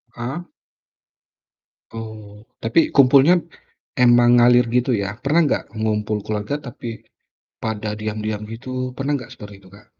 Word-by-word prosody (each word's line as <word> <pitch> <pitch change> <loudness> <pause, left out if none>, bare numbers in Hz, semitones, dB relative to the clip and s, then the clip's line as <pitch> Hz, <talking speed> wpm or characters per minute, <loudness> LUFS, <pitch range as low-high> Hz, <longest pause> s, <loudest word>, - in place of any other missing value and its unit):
Ah. 135 +9 -5 1.4
Oh, 110 -2 -10 0.2
tapi 115 +9 +2
kumpulnya 140 +6 +6 0.6
emang 120 -1 +5
ngalir 120 0 +5
gitu 125 +1 +1
ya? 105 -1 -2
Pernah 150 +7 +2
nggak - - 0
ngumpul 105 -1 -1
keluarga, 105 +5 -3
tapi 115 -4 -8 0.6
pada 110 -1 -3
diam-diam 110 0 -4
gitu 130 +3 -5
pernah 140 +2 -2
nggak 125 0 -11
seperti 105 -2 -11
itu - - -16
Kak? 105 - -17
115 Hz, 125 wpm, -21 LUFS, 105-130 Hz, 1.4 s, kumpulnya